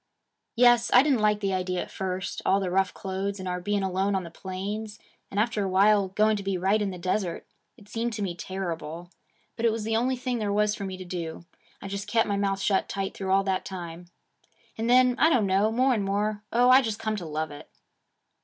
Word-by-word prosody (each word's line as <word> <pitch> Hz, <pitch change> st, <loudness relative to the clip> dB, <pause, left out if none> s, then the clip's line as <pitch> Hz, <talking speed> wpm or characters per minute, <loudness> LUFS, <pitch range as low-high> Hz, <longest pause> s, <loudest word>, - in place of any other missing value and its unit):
'Yes. 240 Hz, 0 st, +5 dB
I 250 Hz, -, +8 dB
didn't 275 Hz, -6 st, +2 dB
like 210 Hz, 0 st, +2 dB
the 195 Hz, -1 st, 0 dB
idea 185 Hz, -1 st, -1 dB
at -, -, -13 dB
first: 190 Hz, 0 st, -4 dB
all 195 Hz, -, +3 dB
the 190 Hz, -2 st, -2 dB
rough 190 Hz, +1 st, +2 dB
clothes, 195 Hz, 0 st, -4 dB
and 185 Hz, -, -5 dB
our 180 Hz, 0 st, -2 dB
being 205 Hz, +2 st, -1 dB
alone 190 Hz, +1 st, 0 dB
on 190 Hz, -, -1 dB
the 170 Hz, -, -9 dB
plains, 205 Hz, +4 st, -5 dB, 0.3 s
and 200 Hz, -, -2 dB
after 215 Hz, -1 st, +1 dB
a 195 Hz, -, -1 dB
while 200 Hz, +1 st, +4 dB
going 215 Hz, +3 st, +2 dB
to -, -, -4 dB
be 195 Hz, -1 st, -1 dB
right 195 Hz, +4 st, +2 dB
in 205 Hz, -, 0 dB
the 185 Hz, -, -6 dB
desert 180 Hz, 0 st, -2 dB, 0.3 s
it 210 Hz, -4 st, -17 dB
seemed 230 Hz, +2 st, -2 dB
to 210 Hz, -1 st, -3 dB
me 185 Hz, -3 st, -2 dB
terrible. 175 Hz, -2 st, -5 dB, 0.4 s
But 230 Hz, 0 st, +1 dB
it -, -, +3 dB
was 220 Hz, -1 st, -3 dB
the 220 Hz, +1 st, -1 dB
only 250 Hz, +3 st, +1 dB
thing 250 Hz, -1 st, -3 dB
there 210 Hz, -2 st, -1 dB
was 210 Hz, +1 st, +2 dB
for 200 Hz, -, -5 dB
me 190 Hz, -1 st, -5 dB
to 185 Hz, -, -8 dB
do. 170 Hz, -2 st, -6 dB, 0.4 s
I -, -, -5 dB
just 200 Hz, +1 st, -5 dB
kep' 225 Hz, +2 st, +2 dB
my 205 Hz, -, -1 dB
mouth 195 Hz, -1 st, 0 dB
shut 195 Hz, 0 st, +1 dB
tight 195 Hz, -1 st, -3 dB
through 190 Hz, -1 st, -5 dB
all 195 Hz, +1 st, +4 dB
that 190 Hz, -1 st, -1 dB
time. 175 Hz, -2 st, -7 dB, 0.7 s
And 225 Hz, +1 st, -2 dB
then, 250 Hz, 0 st, +5 dB
I 320 Hz, -, +6 dB
don't 250 Hz, -10 st, +3 dB
know, 195 Hz, +3 st, +2 dB
more 255 Hz, +3 st, +3 dB
and 215 Hz, -4 st, 0 dB
more, 205 Hz, +2 st, -1 dB
oh, 245 Hz, +2 st, +5 dB
I 260 Hz, +1 st, +8 dB
just 220 Hz, -4 st, -3 dB
come 220 Hz, -1 st, -2 dB
to 180 Hz, -, -6 dB
love 155 Hz, 0 st, -3 dB
it!' 145 Hz, -, -11 dB
200 Hz, 240 wpm, -27 LUFS, 185-220 Hz, 0.7 s, I